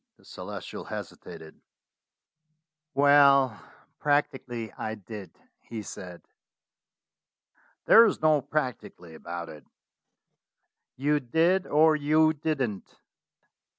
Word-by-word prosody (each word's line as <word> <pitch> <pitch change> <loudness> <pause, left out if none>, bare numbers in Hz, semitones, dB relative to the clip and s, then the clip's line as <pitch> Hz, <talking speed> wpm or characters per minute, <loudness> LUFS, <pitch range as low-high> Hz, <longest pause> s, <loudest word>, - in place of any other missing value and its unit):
The - - -25
Celestial - - -8
hesitated. 80 0 -9 1.3
"Well, 140 -4 +5 0.4
practically 130 -6 -1
I 110 - -5
did," 105 -2 -10 0.3
he 110 -2 -8
said. 90 -3 -10 1.6
"There 230 0 +8
is 205 - -2
no 155 -2 +3
'practically' 125 - -5
about 85 +1 -7
it. 75 - -13 1.3
You 145 +3 +1
did 165 +8 +1
or 155 +1 +4
you 155 +1 +3
didn't." 140 -9 -4
140 Hz, 85 wpm, -27 LUFS, 105-155 Hz, 1.6 s, There